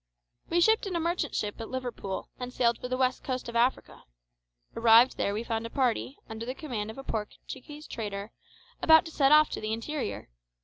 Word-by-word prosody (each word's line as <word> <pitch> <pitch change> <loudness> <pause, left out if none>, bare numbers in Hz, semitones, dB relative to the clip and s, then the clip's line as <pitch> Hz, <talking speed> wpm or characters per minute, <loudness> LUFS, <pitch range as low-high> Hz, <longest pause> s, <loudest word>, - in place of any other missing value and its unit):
We 345 +1 +2
shipped 440 +2 +4
in 370 - -3
a - - +1
merchant 335 -2 -1
ship 210 +2 -3
at 225 - -6
Liverpool, 245 -7 -4
and 250 0 -5
sailed 235 -2 +1
for - - -5
the 255 0 -2
west 255 0 +1
coast 255 -2 -3
of 235 - -7
Africa. 240 +3 0 0.7
Arrived 230 +2 +6
there 200 - 0
we 210 +3 -2
found 230 -1 -2
a - - -11
party, 260 +1 0
under 220 0 -6
the 255 - -3
command 240 -10 -4
of 220 - -8
a 270 - -7
Portuguese 265 +7 -6
trader, 205 -1 -5 0.5
about 320 0 +7
to 325 - -7
set 275 -2 +3
off 305 0 +6
to - - -4
the 215 0 -3
interior. 260 - -4
250 Hz, 205 wpm, -29 LUFS, 225-295 Hz, 0.7 s, about